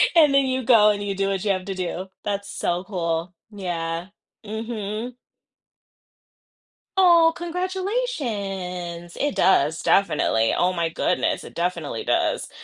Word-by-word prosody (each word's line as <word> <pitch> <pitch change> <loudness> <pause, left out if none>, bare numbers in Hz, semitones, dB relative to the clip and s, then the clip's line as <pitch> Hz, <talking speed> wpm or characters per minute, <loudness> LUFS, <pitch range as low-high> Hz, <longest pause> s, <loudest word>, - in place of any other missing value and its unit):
and 300 -4 +6
then 275 -1 +4
you 260 0 -1
go 220 -4 +6
and 205 -1 0
you 200 -1 -2
do 195 0 0
what 195 +1 -2
you 200 - +3
have 185 -1 -2
to 195 - -4
do. 185 0 -4 0.2
That's 200 0 -3
so 175 -3 -2
cool, 170 -2 -2 0.2
yeah. 170 -3 -3 0.4
Mhm. 220 +2 -5 1.8
Oh, 340 -3 +6
congratulations. 240 - -3
It 290 -1 0
does, 160 -4 +3
definitely. 115 - +2
Oh, 180 +1 +3
my 170 -2 0
goodness. 175 +2 0
Definitely 170 -8 -2
does. - - 0
195 Hz, 130 wpm, -23 LUFS, 175-250 Hz, 1.8 s, and